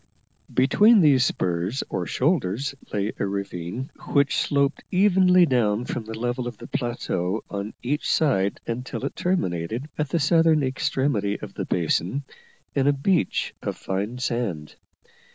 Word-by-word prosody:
Between 205 - +5
these 140 -5 +5
spurs 90 +1 -1
or 90 - -3
shoulders 140 - 0 0.2
lay 105 0 -1
a - - +1
ravine, 100 - -4 0.2
which 140 -1 +3
sloped 140 0 +1
evenly 185 -2 +5
down 120 -5 +1
from 120 -3 -4
the 110 0 -6
level 120 +1 -2
of 120 -3 -6
the 120 - -10
plateau 110 -5 -2
on 100 +1 -4
each 145 +5 -1
side 100 -11 +2
until 125 +3 -4
it - - -4
terminated, 115 - -1
at 150 -2 0
the 170 - +1
southern 160 0 +4
extremity 130 -5 0
of - - -8
the - - -4
basin, 90 - 0 0.5
in 135 -1 +1
a 145 - +5
beach 165 +5 0
of - - -4
fine 100 +6 -3
sand. 115 -12 -2
125 Hz, 145 wpm, -24 LUFS, 100-145 Hz, 0.5 s, Between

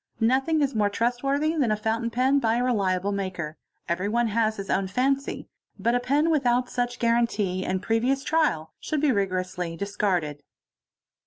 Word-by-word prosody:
Nothing 270 +7 +2
is 275 - 0
more 210 -2 +2
trust 240 +4 -1
worthy 285 +4 +1
than 275 -7 +1
a - - +3
fountain 225 +2 -1
pen 260 +4 +2
by 225 -3 +1
a 245 - +1
reliable 200 -5 +1
maker—everyone 190 +4 -3
has 220 0 +1
his 195 -1 -5
own 190 0 0
faney—but 260 0 -2
a 245 - +3
pen 285 +6 +1
without 250 -4 +1
such 245 0 -2
guarantee 230 -6 +1
and 185 0 -2
previous 250 +5 +1
trial 165 - 0
should 305 - -2
be 300 -2 +3
rigorously 185 -4 -2
discarded. 180 -7 -1
230 Hz, 155 wpm, -25 LUFS, 190-255 Hz, -, a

